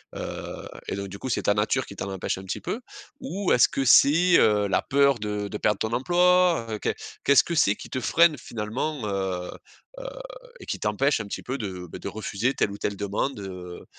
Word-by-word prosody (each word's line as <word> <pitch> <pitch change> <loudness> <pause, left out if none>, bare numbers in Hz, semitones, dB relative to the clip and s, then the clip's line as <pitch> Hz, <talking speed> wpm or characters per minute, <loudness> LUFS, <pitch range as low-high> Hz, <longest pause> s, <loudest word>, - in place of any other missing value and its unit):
heu, - - -6 0.2
et - - -2
donc 100 0 -5
du 100 - -9
coup, 130 - -5
c'est - - -1
ta 105 - +3
nature 110 +6 0
qui 100 - -11
t'en 100 0 -5
empêche 95 0 -3
un - - -9
petit 95 - -4
peu? 240 - -4 0.4
Ou 200 -7 -2
est-ce 125 - +6
que 135 - -2
c'est, 165 +8 +6
heu, 105 -1 +3
la 95 - +1
peur 140 -2 +3
de 105 -1 -3
de 105 - -5
perdre 105 -2 +2
ton 110 +1 -2
emploi, 175 +1 +3
heu? 110 - -3
Qu'e - - -1 0.3
qu'est-ce 140 -1 +6
que 170 - -4
c'est 105 -10 +3
qui - - -11
te 130 - -2
freine 165 +5 +4
finalement, 115 +4 -4
heu, 95 -3 -2 0.5
heu, - - -8 0.5
et - - -11
qui - - -4
t'empêche 125 +7 +1
un 110 - -4
petit - - -6
peu 130 +1 -4
de, 95 -4 -5
bah, - - -7
de - - -6
refuser 110 +3 -2
telle 100 - +1
ou 100 - -7
telle 100 - -2
demande, 100 +5 -2
heu, 90 -2 -8
110 Hz, 225 wpm, -25 LUFS, 100-140 Hz, 0.5 s, est-ce